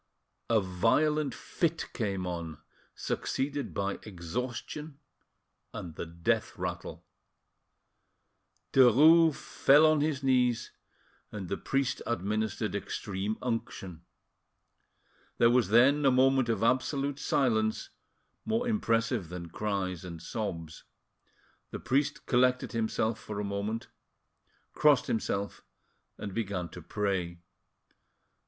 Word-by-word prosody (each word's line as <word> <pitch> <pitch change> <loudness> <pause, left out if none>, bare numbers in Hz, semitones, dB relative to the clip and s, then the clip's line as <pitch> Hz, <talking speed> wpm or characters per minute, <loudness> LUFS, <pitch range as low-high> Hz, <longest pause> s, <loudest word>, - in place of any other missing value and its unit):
A 115 -1 +4
violent 125 +10 +1
fit 165 -1 -2
came 100 -5 -2
on, 85 -3 -5 0.4
succeeded 140 +1 -2
by 100 0 -2
exhaustion 125 - -5 0.8
and 85 -3 -6
the 80 - -6
death 85 0 -1
rattle. - - -5 1.7
Derues 150 +6 +7
fell 145 +3 +4
on 155 -1 +4
his 145 -3 -1
knees, 125 -3 +2 0.6
and 100 -4 -6
the 100 - -1
priest 135 -1 -1
administered 105 0 -1
extreme 100 +1 -3
unction. 115 -8 -4 1.4
There 115 0 +5
was 120 -5 +3
then 130 +7 +5
a 135 - +6
moment 130 -1 +3
of 110 -2 0
absolute 135 +3 +1
silence, 110 -7 0 0.5
more 225 +2 0
impressive 115 - 0
than 85 -1 -7
cries 95 -4 -2
and 85 -2 -7
sobs. 85 -4 -5 0.9
The - - -6
priest 140 +3 0
collected 125 0 +2
himself 110 -1 -1
for 105 -2 -6
a - - -2
moment, 100 +3 -3 0.9
crossed 150 -3 +4
himself, 100 -3 -2 0.5
and 100 -2 -6
began 100 -6 -3
to 90 - -10
pray. 90 -1 -2
115 Hz, 105 wpm, -30 LUFS, 100-135 Hz, 1.7 s, Derues